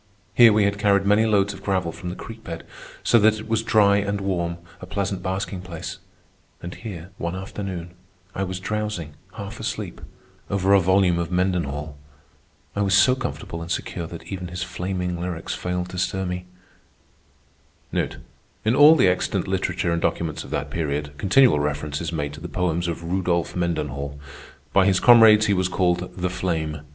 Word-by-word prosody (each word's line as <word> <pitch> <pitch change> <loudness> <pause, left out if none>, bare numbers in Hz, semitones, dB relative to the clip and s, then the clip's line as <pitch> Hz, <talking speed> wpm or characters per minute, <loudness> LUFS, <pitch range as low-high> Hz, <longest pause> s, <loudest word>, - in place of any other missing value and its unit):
Here 115 +2 +8
we 105 0 +3
had 100 0 0
carried 100 -1 +3
many 105 +2 +4
loads 100 -1 +2
of 100 - -11
gravel 95 -4 0
from 85 +2 -7
the 90 - -5
creek 115 0 -10
bed, 85 -1 -7 0.4
so 115 - +5
that 110 +1 +4
it 110 - -8
was 110 -1 +1
dry 100 -3 +4
and 100 0 -1
warm, 85 -3 -2 0.2
a 90 - -9
pleasant 100 -1 -2
basking 95 0 -3
place; 90 -3 -7 0.6
and 85 +1 -7
here, 95 -5 -8
one 85 +2 -2
afternoon, 95 -2 -6 0.4
I 95 - -2
was 95 -1 -4
drowsing, 105 -6 -3 0.2
half 105 +1 -7
asleep, 105 -6 -4 0.5
over 100 0 +2
a 100 - +7
volume 95 -1 +3
of 85 0 -3
Mendenhall. 80 -6 -1 0.8
I 100 - 0
was 100 0 +3
so 125 +5 +6
comfortable 125 -10 -5
and 85 - -7
secure 85 -1 -3
that 85 0 -9
even 95 -2 -6
his 90 +1 -4
flaming 90 -1 -3
lyrics 90 -2 -4
failed 90 0 -3
to 90 - -5
stir 95 +1 -1
me. 90 0 -4 1.5
In 110 +3 -3
all 150 +3 +8
the 125 -11 +4
extant 90 +1 0
literature 90 -2 -1
and 85 0 0
documents 80 -3 -1
of - - -11
that - - -3
period, 75 -2 -2
continual 120 - +5
reference 75 0 -2
is 85 -1 -3
made 75 -3 -3
to 75 - -10
the 90 - -6
poems 85 -1 -1
of 85 0 -4
Rudolph 85 -1 -1
Mendenhall. 75 -5 -2 0.5
By 95 0 +5
his 95 -2 +3
comrades 110 -3 +7
he 105 - +2
was 95 -1 +1
called 90 -1 0
"The 90 0 -1
Flame." 80 -5 -2
90 Hz, 180 wpm, -23 LUFS, 85-100 Hz, 1.5 s, Here